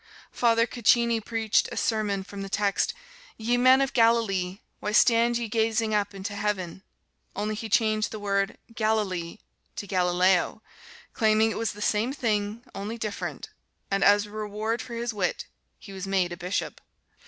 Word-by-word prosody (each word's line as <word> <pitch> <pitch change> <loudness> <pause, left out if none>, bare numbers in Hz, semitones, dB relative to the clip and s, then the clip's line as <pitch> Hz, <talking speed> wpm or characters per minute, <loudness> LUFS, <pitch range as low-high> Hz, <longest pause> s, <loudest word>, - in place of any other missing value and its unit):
Father 230 -1 +3
Caccini 235 -1 +2
preached 225 -1 +1
a - - -6
sermon 210 -3 0
from 200 +1 -8
the 195 - -6
text, 200 0 0 0.4
"Ye 230 +2 0
men 255 +2 +5
of 270 0 0
Galilee, 220 -6 +2 0.2
why 210 - -3
stand 235 +1 +4
ye 235 -1 -3
gazing 220 0 0
up 205 -1 0
into 195 +1 -5
heaven?" 195 -4 -3 0.5
Only 210 +2 -2
he 220 +1 -5
changed 215 0 +2
the 220 - -6
word 200 -1 -1 0.2
"Galilee" 210 -6 -1 0.4
to - - -5
"Galileo," 180 +2 +2 0.5
claiming 220 0 +3
it - - -4
was 225 -1 -1
the 210 +1 -6
same 220 +5 +1
thing, 215 -3 -1
only 210 +4 -5
different, 215 -3 -5 0.4
and 195 0 +1
as 205 +1 +5
reward 215 +2 -3
for 235 - -8
his 235 0 -3
wit 190 -4 -2 0.3
he 200 - -12
was 190 0 -6
made 190 -2 +1
a - - -4
bishop. 180 +3 -3
215 Hz, 160 wpm, -26 LUFS, 200-230 Hz, 0.5 s, men